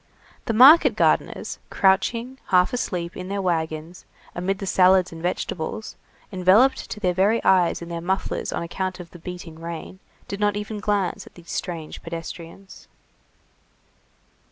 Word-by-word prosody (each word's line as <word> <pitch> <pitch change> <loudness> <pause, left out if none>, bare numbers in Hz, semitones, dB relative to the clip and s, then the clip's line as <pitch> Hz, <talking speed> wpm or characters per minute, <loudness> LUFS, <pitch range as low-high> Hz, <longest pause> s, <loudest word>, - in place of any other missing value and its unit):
The 230 - -1
market 275 +9 +8
gardeners, - - 0
crouching, 230 +6 +1
half 180 +3 +3
asleep, 180 -7 -3
in 185 - -6
their 200 +1 -3
wagons, 165 -2 -3 0.3
amid 190 +2 -2
the 195 - -5
salads 185 -1 +4
and 165 -1 -9
vegetables, 180 +4 -4 0.4
enveloped 190 +8 +3
to 210 - -6
their 180 -3 +1
very 200 +5 +2
eyes 180 -2 +3
in 170 - -9
their 170 0 -4
mufflers 190 +3 -2
on - - -3
account 185 +2 -4
of 175 -1 -10
the 175 - -12
beating 170 -2 -9
rain, 170 +2 -7 0.3
did 200 - -5
not 205 -1 +1
even 210 +1 -5
glance 205 -3 -1
at - - -17
these 170 -1 -12
strange 165 -4 -5
pedestrians. 170 +3 -9
185 Hz, 150 wpm, -23 LUFS, 170-200 Hz, 0.4 s, market